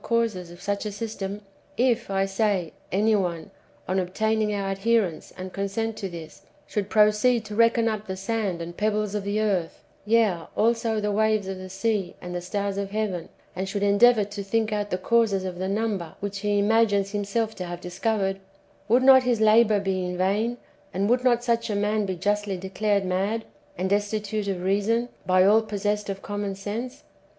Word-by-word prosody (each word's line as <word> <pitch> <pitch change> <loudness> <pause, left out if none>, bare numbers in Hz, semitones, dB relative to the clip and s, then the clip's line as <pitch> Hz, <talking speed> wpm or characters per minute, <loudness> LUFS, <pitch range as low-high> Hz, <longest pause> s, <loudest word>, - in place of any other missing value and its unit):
217 230 -5 0
causes 175 - -12
of 175 - -12
such 200 +1 -2
a 210 - -3
system: 205 -1 -5 0.4
if, 240 -2 +1
[I 195 0 +1
sayj 195 -4 0 0.2
any 215 +3 +3
one, 175 -5 -2 0.4
on 185 +1 +1
obtaining 215 +4 0
our 200 -1 -2
adherence 195 -4 0
and 185 0 -7
consent 205 +3 -2
to 195 - -4
this, 165 -3 -10 0.3
shoukl 205 -1 -2
proceed 215 +2 +3
to 215 - -7
reckon 230 0 +4
up 215 -1 -2
the 190 - -3
sand 195 -4 -2
and 170 +1 -8
pebbles 210 0 0
of 210 -1 -2
the 200 +2 -1
earth, 190 -6 -1 0.2
yea 210 -6 +2
also 230 0 +2
the 210 0 -1
waves 215 -1 +1
of 190 -1 -5
the 185 0 -8
sea 195 0 -1
and 180 0 -7
the 175 - -3
stars 200 +2 -2
of 200 -1 -3
heaven, 200 -5 -2 0.3
and 190 +1 -3
should 200 +1 -2
endeavour 210 +2 +5
to 205 0 -6
think 215 +2 0
out 205 -1 -2
the 180 - -1
causes 200 -1 +2
of 180 -1 -5
the 190 +1 -2
number 200 -5 -2
which 200 0 -4
he 205 0 +1
imacrines 205 -2 +2
him 205 0 -1
self 220 +2 -1
to 185 - -6
have 175 0 -6
discovered, 195 +2 -1 0.5
would 245 +4 +4
not 265 0 +8
his 245 -3 +1
labour 215 -1 +5
be 190 -2 -1
in 180 0 -3
vain, 210 +6 0 0.4
and 200 +4 +1
would 250 0 +2
not 240 -2 +3
such 235 -1 0
a 210 - -1
man 210 0 0
be 190 - -2
justly 205 +1 -1
declared 195 +2 0
mad, 195 +5 -1 0.3
and 190 +2 -2
destitute 205 0 -1
of 185 -2 -2
reason, 210 +5 +1 0.2
by 185 0 +5
all 215 +3 +6
possessed 210 -1 -2
of 195 0 -5
common 205 -1 -3
sense 215 +6 -5
205 Hz, 195 wpm, -25 LUFS, 190-220 Hz, 0.5 s, not